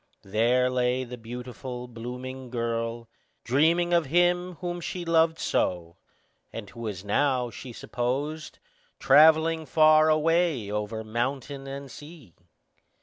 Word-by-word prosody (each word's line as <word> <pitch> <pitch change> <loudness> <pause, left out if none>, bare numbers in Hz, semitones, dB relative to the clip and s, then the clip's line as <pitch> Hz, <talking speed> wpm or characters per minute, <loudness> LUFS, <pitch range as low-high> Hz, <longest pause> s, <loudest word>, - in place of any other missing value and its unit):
There 120 +5 +2
lay 125 0 0
the 125 0 -8
beautiful, 125 +1 -7
blooming 125 +2 -7
girl, 115 -1 -3 0.4
dreaming 165 +7 +2
of 170 -4 +2
him 175 +3 +2
whom 175 0 -5
she 175 0 -5
loved 165 -1 +3
so, 85 -1 -1 0.5
and 115 -3 -7
who 115 - -13
was 105 -4 -5
now, 125 +2 +1
she 125 - -9
supposed, 140 +7 -4 0.4
travelling 160 +1 +5
far 155 +2 +5
away 155 - +1
over 105 +1 -3
mountain 135 +5 -3
and 135 0 -7
sea. 145 - -13
130 Hz, 120 wpm, -26 LUFS, 115-155 Hz, 0.5 s, travelling